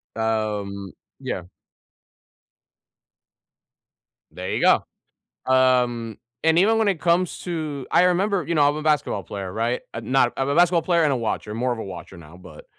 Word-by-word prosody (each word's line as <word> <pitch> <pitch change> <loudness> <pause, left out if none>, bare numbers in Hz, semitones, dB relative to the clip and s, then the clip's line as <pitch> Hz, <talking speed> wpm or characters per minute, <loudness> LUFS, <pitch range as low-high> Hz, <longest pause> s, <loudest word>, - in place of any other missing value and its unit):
Um, 105 -3 -2 0.3
yeah. 90 - -4 2.9
There - - -6
you - - -1
go, - - +4 0.7
um, 125 -4 +2 0.2
and 160 +1 +3
even 220 +5 +4
when 220 - +2
it 185 -6 0
comes 175 +1 +1
to 155 -6 -4
I - - +5
remember 185 +1 +1
you 170 - -1
know, 145 -2 +4
I'm 145 - -1
a 155 - -4
basketball 150 -9 0
player, 95 -1 -6
right, 115 +4 -1
I'm 115 +1 -6
not 125 -3 +3
I'm 135 +1 -1
a 140 - 0
basketball 175 0 +4
player 170 0 +2
and 145 - +2
a - - +1
watcher, 110 -2 -3
more 125 +2 0
of 120 - -5
a - - -5
watcher 95 0 -9
now, 80 0 -14
but 90 -4 -14
130 Hz, 170 wpm, -23 LUFS, 110-165 Hz, 2.9 s, I